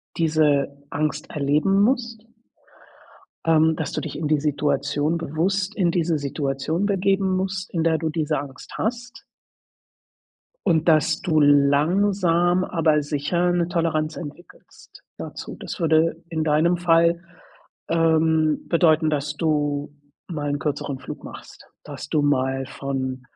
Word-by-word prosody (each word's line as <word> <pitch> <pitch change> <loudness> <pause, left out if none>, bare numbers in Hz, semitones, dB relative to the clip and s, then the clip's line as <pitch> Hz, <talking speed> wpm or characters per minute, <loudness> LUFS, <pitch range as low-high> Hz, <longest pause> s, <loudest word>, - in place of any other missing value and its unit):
diese 150 -3 +1
Angst 150 0 -2
erleben 150 +7 +2
musst 230 -1 0 1.2
ähm, 160 0 +4
dass 160 -1 -4
du - - -3
dich - - -6
in 155 0 -2
die 150 0 +2
Situation 145 +1 0
bewusst 185 +6 -1
in 180 -6 +2
diese 165 -2 0
Situation 145 +4 -2
begeben 195 -1 +1
musst, 185 0 -3
in 165 -2 -1
der 160 -1 +2
du 160 - -1
diese 155 -1 -1
Angst 135 -2 -10
hast. 240 +2 -4 1.4
Und 165 -2 +3
dass 155 -3 +3
du 160 -4 +1
langsam, 170 +5 +3
aber 160 -3 +2
sicher, 155 +5 0
'ne 175 -1 0
Toleranz 160 -3 -1
entwickelst 170 +2 -12 0.2
dazu. - - -7
Das - - -6
würde 165 0 +2
in 160 -2 -2
deinem 160 +3 +2
Fall, 170 0 +3 0.7
ähm, 160 -1 +2
bedeuten, 160 -2 +3
dass 145 -1 -2
du 145 -2 0 0.4
mal 150 -4 -3
'n 145 - -1
kürzeren 145 -2 -3
Flug - - -9
machst. - - -12 0.2
Dass - - -8
du 155 - +2
mal 135 -2 0
von 130 -1 -4
160 Hz, 130 wpm, -23 LUFS, 145-175 Hz, 1.4 s, ähm